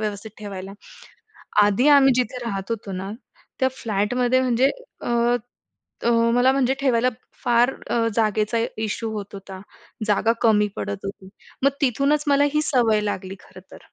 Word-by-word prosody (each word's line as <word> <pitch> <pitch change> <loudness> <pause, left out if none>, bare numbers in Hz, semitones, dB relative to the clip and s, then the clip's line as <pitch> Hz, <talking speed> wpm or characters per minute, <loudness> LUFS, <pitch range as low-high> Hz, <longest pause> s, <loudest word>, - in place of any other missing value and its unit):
व्यवस्थित 210 0 -4
ठेवायला. 195 -2 -7 0.9
आधी 205 +7 +3
आम्ही 275 -2 +7
जिथे 250 0 -1
राहत 195 -2 -4
होतो 210 -3 -4
ना 190 +1 -5 0.5
त्या 260 - +4
फ्लॅटमध्ये 240 +4 +1
म्हणजे 255 +1 +2 0.3
अ, - - -5 0.9
अ, 235 - +2 0.2
मला 250 +2 +4
म्हणजे 265 -1 +1
ठेवायला 250 -3 +2 0.4
फार 240 +2 +3 0.2
अ, 230 -1 +1
जागेचा 215 0 +1 0.2
इश्यू 220 +1 -3
होत 205 -1 -6
होता. 195 -1 -9 0.5
जागा 215 +2 +2
कमी 210 -2 +4
पडत 200 0 -5
होती. 195 -1 -7 0.3
मग 275 - +5
तिथूनच 280 +3 +1
मला 285 0 +4
ही 300 - +3
सवय 240 -8 +2
लागली 195 -2 -4
खरं - - -15
तर. - - -11
230 Hz, 145 wpm, -23 LUFS, 205-255 Hz, 0.9 s, आम्ही